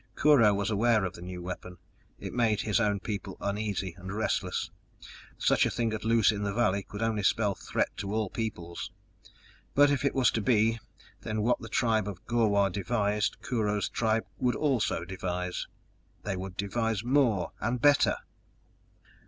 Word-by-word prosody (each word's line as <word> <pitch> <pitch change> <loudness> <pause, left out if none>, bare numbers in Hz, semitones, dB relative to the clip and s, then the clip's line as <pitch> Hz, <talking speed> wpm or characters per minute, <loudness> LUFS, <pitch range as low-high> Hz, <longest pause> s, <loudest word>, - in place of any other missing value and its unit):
Kurho 135 -8 +5
was 100 +2 -1
aware 110 -1 +3
of 90 - -4
the - - -11
new 90 0 -7
weapon; 90 0 -7 0.4
it - - -7
made 110 -4 +2
his 110 0 +1
own 105 -3 +1
people 100 -1 -5
uneasy 100 -3 -2
and 95 +2 -7
restless; 110 +2 -1 0.7
such - - +3
a - - +2
thing 115 -2 -1
at 110 - -4
loose 115 -1 +4
in 105 -1 -4
the 100 -1 -2
valley 100 -4 +2
could 100 +2 -6
only 110 -2 0
spell 100 +1 +2
threat 90 - -1
to 100 -2 -4
all 110 -1 0
peoples! 85 -7 -5 0.8
But, 145 0 +6
if 140 - 0
it 140 - +1
was 130 -2 +4
to 110 - -1
be, 115 +1 +2 0.4
then 110 -1 -2
what 120 +2 +2
the - - -9
tribe 110 -4 +1
of 95 -3 -7
Gor 120 -2 +2
wah 100 -1 +3
devised 105 +2 -1
Kurho's 105 -4 0
tribe 110 -1 0
would 125 -1 +1
also 130 - 0
devise. 90 -1 -3 0.6
They 100 - -2
would 95 0 -6
devise 110 +1 -1
more 120 -7 +2
and 120 +3 -1
better! 145 +3 +4
105 Hz, 170 wpm, -29 LUFS, 100-115 Hz, 0.8 s, But